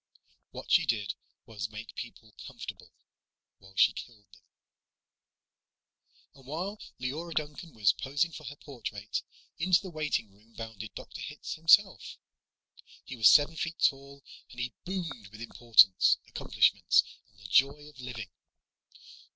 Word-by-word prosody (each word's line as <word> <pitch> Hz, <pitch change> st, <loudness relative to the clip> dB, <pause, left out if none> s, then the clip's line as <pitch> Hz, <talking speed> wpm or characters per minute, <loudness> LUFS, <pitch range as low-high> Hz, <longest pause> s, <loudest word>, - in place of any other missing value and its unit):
What -, -, -9 dB
she -, -, +5 dB
did 105 Hz, -4 st, 0 dB, 0.3 s
was 105 Hz, -2 st, -5 dB
make 110 Hz, +1 st, -9 dB
people 110 Hz, -3 st, -9 dB
comfortable -, -, -9 dB, 0.7 s
while 95 Hz, 0 st, -18 dB
she -, -, +5 dB
killed 110 Hz, -4 st, -10 dB
them. 100 Hz, -, -19 dB, 1.9 s
And, 135 Hz, -1 st, -18 dB
while 185 Hz, +8 st, -4 dB, 0.2 s
Leora 155 Hz, +7 st, -4 dB
Duncan 155 Hz, +2 st, -4 dB
was 105 Hz, -4 st, +4 dB
posing 145 Hz, +5 st, -1 dB
for 155 Hz, -1 st, -10 dB
her 140 Hz, +2 st, -7 dB
portrait, 110 Hz, -7 st, -5 dB, 0.4 s
into 180 Hz, +2 st, +4 dB
the 190 Hz, -3 st, -9 dB
waitingroom 115 Hz, -9 st, -4 dB
bounded 110 Hz, -2 st, -8 dB
Dr. -, -, -9 dB
Hitz -, -, -6 dB
himself. 180 Hz, +5 st, +4 dB, 0.9 s
He 130 Hz, -, -7 dB
was 115 Hz, -3 st, +7 dB
seven 150 Hz, +2 st, +6 dB
feet 165 Hz, +1 st, -3 dB
tall, 140 Hz, 0 st, 0 dB, 0.3 s
and 120 Hz, -, -12 dB
he 120 Hz, 0 st, -3 dB
boomed 175 Hz, -, -4 dB
with 105 Hz, +2 st, -14 dB
importance, 115 Hz, -4 st, +5 dB
accomplishments, 95 Hz, -3 st, +3 dB, 0.3 s
and 105 Hz, -, -30 dB
the 100 Hz, -, -10 dB
joy 140 Hz, +8 st, +3 dB
of 150 Hz, -3 st, -16 dB
living. 115 Hz, -6 st, -7 dB
125 Hz, 135 wpm, -30 LUFS, 110-155 Hz, 1.9 s, was